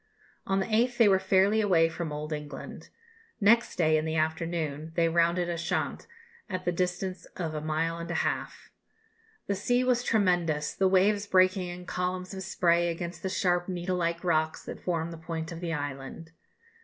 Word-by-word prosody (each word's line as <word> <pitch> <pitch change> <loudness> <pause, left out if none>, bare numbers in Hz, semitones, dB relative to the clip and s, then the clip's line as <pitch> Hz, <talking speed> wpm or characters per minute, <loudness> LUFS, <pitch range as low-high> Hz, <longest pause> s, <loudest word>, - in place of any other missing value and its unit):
On 195 0 +2
the 190 - 0
8th 240 +3 +1
they 230 - +6
were 190 -2 +5
fairly 195 +3 +3
away 175 -6 +4
from 165 -1 -5
Old 150 +1 -4
England. 150 -2 -7 0.5
Next 230 +3 +4
day, 155 -2 +3
in - - -3
the 160 0 -2
afternoon, 160 -1 -2
they 170 -1 +3
rounded 170 +1 +2
Ushant, 170 -1 -2 0.4
at 185 -1 -4
the 175 - +2
distance 180 +1 -2
of 165 -3 -3
a 155 - -3
mile 160 +2 -1
and 170 - -6
a - - -2
half: - - -4 0.7
"the 200 - 0
sea 245 +6 +1
was 250 -1 +2
tremendous, 175 -10 +1
the 190 - +2
waves 200 +2 +3
breaking 185 -1 +3
in 175 0 -7
columns 180 +1 -3
of 190 - -5
spray 175 -2 +2
against 170 0 -5
the 190 - -2
sharp 175 -1 +1
needle 180 0 -2
like 170 0 -1
rocks 160 -3 0
that - - -7
form 170 -2 -2
the 165 - -7
point 160 0 -5
of 165 - -6
the 170 -1 -3
island." 145 +2 -5
175 Hz, 180 wpm, -28 LUFS, 165-190 Hz, 0.7 s, they